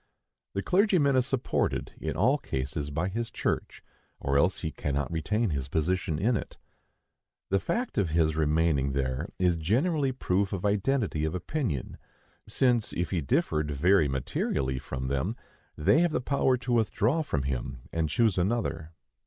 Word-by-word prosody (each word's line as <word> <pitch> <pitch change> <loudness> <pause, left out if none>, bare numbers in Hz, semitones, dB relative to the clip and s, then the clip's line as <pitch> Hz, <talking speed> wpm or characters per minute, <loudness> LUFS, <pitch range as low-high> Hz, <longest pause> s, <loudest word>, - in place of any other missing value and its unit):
The 100 - -2
clergyman 180 -8 +3
is 130 0 +2
supported, 135 -2 -1
in - - -3
all 130 - +3
cases, 70 - -3
by 80 +5 -1
his 115 +4 -3
church, - - -3 0.4
or 70 0 -1
else 85 +6 +2
he 80 - -2
cannot 70 0 -2
retain 100 +6 0
his 70 -3 -2
position 80 +2 0
in 115 +8 +2
it. - - -5 0.9
The 100 - +3
fact 245 - -2
of 95 -5 +1
his 80 -1 +2
remaining 75 -3 +2
there 65 +3 -1
is 90 -2 +2
generally 135 - +1
proof 100 -6 0
of 95 0 -3
identity 105 - +1
of 80 +2 -1
opinion, 90 - -3 0.5
since 120 -4 +1
if 85 0 -2
he 90 -4 0
differed 75 +2 0
very 80 +3 +3
materially 65 0 -1
from 65 0 -5
them, 70 - -1 0.4
they 105 - +4
have 175 -3 +2
the - - +1
power 130 0 +2
to 125 0 -2
withdraw 115 +5 +2
from 75 - -2
him 65 -2 -3
and 80 -2 0
choose 105 +3 +2
another. 85 -6 -1
90 Hz, 160 wpm, -28 LUFS, 75-120 Hz, 0.9 s, they